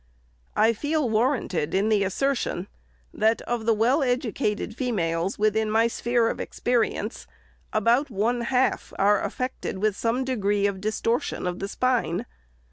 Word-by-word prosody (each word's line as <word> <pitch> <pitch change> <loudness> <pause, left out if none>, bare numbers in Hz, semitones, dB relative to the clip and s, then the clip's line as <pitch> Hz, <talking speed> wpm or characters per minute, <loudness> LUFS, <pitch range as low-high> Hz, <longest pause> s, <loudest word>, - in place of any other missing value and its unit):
" - - -37
I 220 +2 +4
feel 290 +4 0
warranted 215 - 0
in 200 +3 +2
the 210 -2 +3
assertion, 200 -3 -1 0.5
that, 220 +1 +2
of 235 -2 -3
the 230 - +5
well 245 +8 +3
educated 225 -4 -1
females, 185 -8 -1
within 215 +1 +1
my 225 +1 +3
sphere 235 0 +1
of - - -2
experience, 240 -2 -1 0.4
about 235 +7 +2
one 235 +3 0
half 255 +2 0
are 205 +1 +3
affected 255 -6 -3
with 210 +1 +1
some 235 +4 0
degree 205 -6 0
of 195 -2 -1
distortion 230 +5 -1
of 180 +1 -3
spine. 240 -5 0
220 Hz, 140 wpm, -25 LUFS, 200-245 Hz, 0.5 s, the